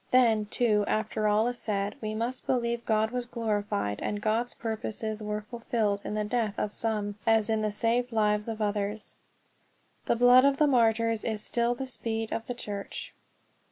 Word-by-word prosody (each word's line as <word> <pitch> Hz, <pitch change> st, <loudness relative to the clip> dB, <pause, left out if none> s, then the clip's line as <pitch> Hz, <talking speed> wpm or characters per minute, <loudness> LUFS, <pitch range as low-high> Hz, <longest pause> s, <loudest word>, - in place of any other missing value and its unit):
Then, 225 Hz, -4 st, +4 dB
too, 215 Hz, -2 st, +2 dB
after 215 Hz, 0 st, 0 dB
all 210 Hz, +2 st, +3 dB
is 245 Hz, 0 st, -3 dB
said, 200 Hz, -2 st, -1 dB
we 215 Hz, -1 st, -3 dB
must 235 Hz, +3 st, -3 dB
believe 235 Hz, -2 st, 0 dB
God 220 Hz, 0 st, +2 dB
was 245 Hz, -1 st, -3 dB
glorified 205 Hz, -, -2 dB
and 205 Hz, -, -2 dB
God's 225 Hz, +3 st, 0 dB
purposes 220 Hz, -1 st, -3 dB
were 210 Hz, 0 st, -3 dB
fulfilled 225 Hz, -4 st, -1 dB
in 210 Hz, -, -4 dB
the 215 Hz, -, 0 dB
death 215 Hz, -1 st, -1 dB
of 210 Hz, -, -2 dB
some 210 Hz, -2 st, -2 dB
as 225 Hz, -1 st, +4 dB
in 220 Hz, -1 st, +1 dB
the 215 Hz, -, +1 dB
saved 235 Hz, +4 st, 0 dB
lives 210 Hz, -1 st, +1 dB
of 220 Hz, -1 st, -2 dB
others. 205 Hz, +1 st, -2 dB, 0.9 s
The -, -, +2 dB
blood 245 Hz, +2 st, +7 dB
of 280 Hz, 0 st, +4 dB
the 305 Hz, -, +4 dB
martyrs 230 Hz, -4 st, +2 dB
is 215 Hz, -2 st, -1 dB
still 235 Hz, 0 st, 0 dB
the 265 Hz, -, -4 dB
seed 225 Hz, -3 st, -2 dB
of 230 Hz, -, -4 dB
the 245 Hz, -, -3 dB
Church. 205 Hz, -4 st, -6 dB
220 Hz, 180 wpm, -28 LUFS, 210-235 Hz, 0.9 s, blood